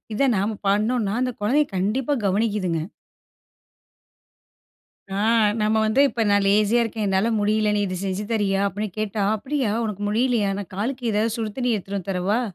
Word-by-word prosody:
இத -, -, -2 dB, 0.2 s
நம்ம 205 Hz, +2 st, -1 dB
பண்ணனோம்னா. 210 Hz, +1 st, +1 dB
அந்த 255 Hz, 0 st, 0 dB
குழந்தைய 275 Hz, +8 st, +2 dB
கண்டிப்பா 230 Hz, +10 st, 0 dB
கவனிக்கிதுங்க. 195 Hz, -4 st, 0 dB, 2.3 s
ஆ. -, -, -2 dB, 0.5 s
நம்ம 215 Hz, +1 st, +2 dB
வந்து 220 Hz, +5 st, +2 dB
இப்ப 235 Hz, -, -2 dB
"நான் 200 Hz, 0 st, +3 dB
லேஸியா 210 Hz, +4 st, +3 dB
இருக்கேன், 225 Hz, -1 st, -3 dB
என்னால 195 Hz, +3 st, +2 dB
முடியல 210 Hz, 0 st, +1 dB
நீ -, -, +1 dB
இது 185 Hz, -1 st, -4 dB
செஞ்சு 195 Hz, +2 st, -2 dB
தறியா?" 200 Hz, -3 st, +1 dB
அப்டின்னு 210 Hz, +2 st, -4 dB
கேட்டா. 215 Hz, -1 st, -2 dB
"அப்டியா 260 Hz, 0 st, -2 dB
உனக்கு 210 Hz, -2 st, -4 dB
முடியலையா 225 Hz, -1 st, +1 dB
நான் 200 Hz, -3 st, -7 dB
காலுக்கு 240 Hz, +3 st, -2 dB
ஏதாது 215 Hz, +2 st, 0 dB
சுடு 225 Hz, -2 st, -3 dB
தண்ணி 245 Hz, -2 st, +1 dB
எடுத்துட்டு 200 Hz, 0 st, -5 dB
வந்து 195 Hz, +1 st, -6 dB
தரவா?" 190 Hz, +6 st, 0 dB
210 Hz, 160 wpm, -23 LUFS, 200-230 Hz, 2.3 s, நான்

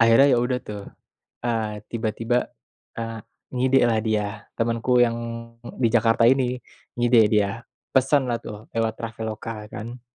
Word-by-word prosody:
Akhirnya 115 Hz, +4 st, +7 dB
ya 125 Hz, -, +4 dB
udah 125 Hz, +1 st, +1 dB
tuh, 105 Hz, -1 st, -7 dB, 0.6 s
eee, 110 Hz, -3 st, -2 dB
tiba-tiba, 115 Hz, +1 st, -1 dB, 0.5 s
eee, 115 Hz, -2 st, -5 dB, 0.3 s
ngidelah 125 Hz, -3 st, +3 dB
dia 110 Hz, -2 st, +1 dB, 0.3 s
temenku 115 Hz, +2 st, +2 dB
yang 115 Hz, -1 st, +4 dB, 0.6 s
di 120 Hz, -, +4 dB
Jakarta 115 Hz, 0 st, +4 dB
ini 125 Hz, -1 st, +2 dB, 0.4 s
ngide 120 Hz, -3 st, +5 dB
dia, 105 Hz, -2 st, +3 dB, 0.5 s
pesenlah 130 Hz, -2 st, +3 dB
tuh 105 Hz, +1 st, -9 dB
lewat 115 Hz, -1 st, +1 dB
Traveloka 110 Hz, -1 st, -6 dB
kan. 120 Hz, +3 st, -7 dB
115 Hz, 125 wpm, -24 LUFS, 110-125 Hz, 0.6 s, Akhirnya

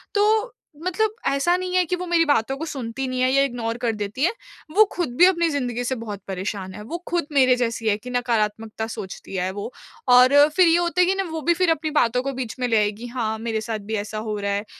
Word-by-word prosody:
तो 430 Hz, +4 st, +2 dB, 0.3 s
मतलब 420 Hz, +4 st, 0 dB
ऐसा 280 Hz, +6 st, +2 dB
नहीं 365 Hz, 0 st, -3 dB
है 365 Hz, -, +4 dB
कि 360 Hz, -, -1 dB
वो 360 Hz, 0 st, -5 dB
मेरी 340 Hz, -1 st, +3 dB
बातों 270 Hz, -3 st, +1 dB
को 320 Hz, -, -4 dB
सुनती 265 Hz, -3 st, -4 dB
नहीं 255 Hz, 0 st, -2 dB
है 255 Hz, 0 st, +3 dB
या 275 Hz, +1 st, +4 dB
इग्नोर 235 Hz, -3 st, -3 dB
कर 240 Hz, -2 st, 0 dB
देती 210 Hz, +6 st, -3 dB
है। 350 Hz, -, +4 dB, 0.4 s
वो 430 Hz, -, +8 dB
खुद 330 Hz, -9 st, -3 dB
भी 355 Hz, -, +8 dB
अपनी 340 Hz, -3 st, +3 dB
ज़िंदगी 245 Hz, -4 st, -2 dB
से 260 Hz, +2 st, -1 dB
बहुत 215 Hz, -4 st, -7 dB
परेशान 190 Hz, 0 st, -4 dB
है, 210 Hz, -, -9 dB
वो 320 Hz, +11 st, -5 dB
खुद 345 Hz, -2 st, 0 dB
मेरे 255 Hz, -3 st, +5 dB
जैसी 230 Hz, -2 st, -2 dB
है 205 Hz, -, +2 dB
कि 250 Hz, +4 st, -10 dB
नकारात्मकता 225 Hz, -2 st, -1 dB
सोचती 195 Hz, -2 st, -8 dB
है 185 Hz, 0 st, -1 dB
वो। 205 Hz, +5 st, -6 dB, 0.4 s
और 255 Hz, +4 st, +7 dB
फिर 365 Hz, -2 st, +6 dB
ये 330 Hz, -, +5 dB
होता 345 Hz, +1 st, +1 dB
है 360 Hz, -, +6 dB
कि 380 Hz, -, +2 dB
ना 390 Hz, -, 0 dB
वो 320 Hz, -1 st, -4 dB
भी 340 Hz, +4 st, +3 dB
फिर 345 Hz, 0 st, +2 dB
अपनी 310 Hz, -1 st, -1 dB
बातों 240 Hz, +1 st, +2 dB
को 275 Hz, -, -3 dB
बीच 250 Hz, -3 st, -5 dB
में 250 Hz, -, 0 dB
ले 225 Hz, -, +2 dB
आएगी, 210 Hz, +3 st, -1 dB
हाँ, 230 Hz, -3 st, -2 dB
मेरे 225 Hz, -1 st, -2 dB
साथ 220 Hz, -1 st, -4 dB
भी -, -, 0 dB
ऐसा 215 Hz, +1 st, -7 dB
हो 215 Hz, -1 st, -3 dB
रहा 200 Hz, 0 st, -2 dB
है। 200 Hz, +1 st, -2 dB
250 Hz, 250 wpm, -23 LUFS, 220-330 Hz, 0.4 s, वो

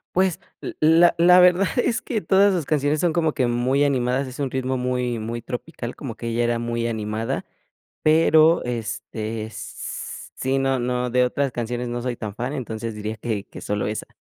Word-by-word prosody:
Pues, 185 Hz, -1 st, +2 dB, 0.2 s
l -, -, -6 dB
la 165 Hz, +2 st, +6 dB
la 180 Hz, +2 st, +7 dB
verdad 180 Hz, +2 st, +5 dB
es 245 Hz, 0 st, +1 dB
que 230 Hz, -, -2 dB
todas 195 Hz, +4 st, +4 dB
sus 170 Hz, -5 st, -1 dB
canciones 150 Hz, +1 st, +1 dB
son 170 Hz, 0 st, +1 dB
como 160 Hz, -2 st, +1 dB
que 130 Hz, -, +1 dB
muy 125 Hz, +4 st, +1 dB
animadas. 130 Hz, -1 st, +1 dB
Es 130 Hz, +1 st, -9 dB
un 140 Hz, -2 st, -1 dB
ritmo 130 Hz, 0 st, -1 dB
muy 125 Hz, -1 st, -1 dB
muy 115 Hz, +2 st, -4 dB
tropical, 125 Hz, -1 st, -6 dB
como 130 Hz, -7 st, -6 dB
que 115 Hz, -, -6 dB
ella 115 Hz, +1 st, 0 dB
era 120 Hz, 0 st, +1 dB
muy 120 Hz, 0 st, -2 dB
animada, 110 Hz, 0 st, -3 dB, 0.6 s
pero, 160 Hz, +1 st, +5 dB
este, 110 Hz, -1 st, -4 dB
s 110 Hz, -, -9 dB
s -, -, -7 dB
sí, 130 Hz, +1 st, 0 dB
no 135 Hz, -1 st, +1 dB
no 125 Hz, 0 st, -1 dB
de 125 Hz, +1 st, +4 dB
otras 135 Hz, +2 st, -1 dB
canciones 120 Hz, +1 st, -3 dB
no 120 Hz, 0 st, -3 dB
soy 125 Hz, 0 st, -2 dB
tan 105 Hz, -3 st, -6 dB
fan, 125 Hz, +6 st, -4 dB
entonces 115 Hz, -4 st, -4 dB
diría 105 Hz, +1 st, -4 dB
que 105 Hz, -2 st, -3 dB
que -, -, -11 dB
solo 105 Hz, 0 st, -2 dB
esa. 105 Hz, +1 st, -4 dB
125 Hz, 200 wpm, -23 LUFS, 115-155 Hz, 0.6 s, la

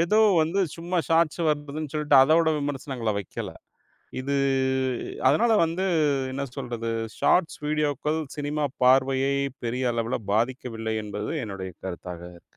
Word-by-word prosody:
ஏதோ 190 Hz, +6 st, +3 dB, 0.2 s
வந்து 175 Hz, +5 st, 0 dB, 0.2 s
சும்மா 175 Hz, +2 st, -2 dB
ஷாட்ஸ் 165 Hz, 0 st, +2 dB
வந்துதுன்னு 150 Hz, 0 st, -3 dB
சொல்ட்டு 150 Hz, -2 st, +3 dB
அதோட 160 Hz, +3 st, +4 dB
விமர்சனங்கள 135 Hz, -5 st, -2 dB
வெக்கல. 95 Hz, -, -6 dB, 0.7 s
இது 140 Hz, +2 st, -2 dB, 0.9 s
அதனால 225 Hz, -, +3 dB
வந்து 170 Hz, +4 st, -2 dB, 0.5 s
என்ன 140 Hz, +1 st, -3 dB
சொல்றது? 115 Hz, -1 st, -4 dB, 0.3 s
ஷாட்ஸ் 175 Hz, -2 st, +2 dB
வீடியோக்கள் 150 Hz, 0 st, 0 dB, 0.2 s
சினிமா 145 Hz, 0 st, -1 dB, 0.2 s
பார்வையை 135 Hz, +1 st, +4 dB, 0.3 s
பெரிய 125 Hz, +1 st, 0 dB
அளவுல 115 Hz, +1 st, -1 dB
பாதிக்கவில்லை 115 Hz, -1 st, -1 dB
என்பது 105 Hz, 0 st, -4 dB
என்னுடைய 95 Hz, -3 st, -6 dB
கருத்தாகக்கு. 90 Hz, -1 st, -8 dB
140 Hz, 115 wpm, -26 LUFS, 115-155 Hz, 0.9 s, அதோட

